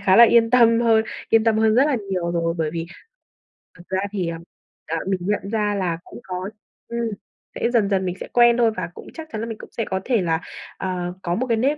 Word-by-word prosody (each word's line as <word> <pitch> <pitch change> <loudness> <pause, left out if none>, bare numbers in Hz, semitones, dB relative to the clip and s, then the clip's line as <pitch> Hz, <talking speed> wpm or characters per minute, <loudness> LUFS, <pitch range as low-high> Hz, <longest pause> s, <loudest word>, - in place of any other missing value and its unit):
khá 195 -1 +4
là 235 - +10
yên 230 0 +4
tâm 235 -2 +5
hơn, 225 -2 +4 0.2
yên 225 -1 +4
tâm 225 -1 +3
hơn 220 0 +3
rất 260 +4 +5
là 290 -4 +1
nhiều 180 -2 -1
rồi. 165 -1 0
Bởi 160 -2 0
vì 165 0 -3 0.9
thật 175 - -14
ra 190 - 0
thì, 190 -4 -2
ờ, 165 - -4 0.5
ờ, 165 +2 -1
mình 190 -1 0
nhận 200 +1 -1
ra 210 -2 0
là 180 -4 -1
cũng - - -11
có 185 0 -5 0.4
ừm, 235 - -4 0.6
sẽ - - 0
dần 215 -4 +3
dần 190 -2 +1
mình 180 -1 -2
sẽ - - -6
quen 240 -1 +6
thôi, 235 -2 +4
và 170 - -3
cũng - - -11
chắc 320 -1 -8
chắn 215 - -4
là 230 - -3
mình 225 -2 -6
cũng - - -12
sẽ 230 - 0
có 190 - -2
thể 240 -5 +2
là, 165 -1 0 0.4
ờ, 180 -2 -3
có 175 -1 -1
một 255 +5 -1
cái 230 -2 +1
nếp 275 +6 +1
210 Hz, 250 wpm, -22 LUFS, 180-230 Hz, 0.9 s, là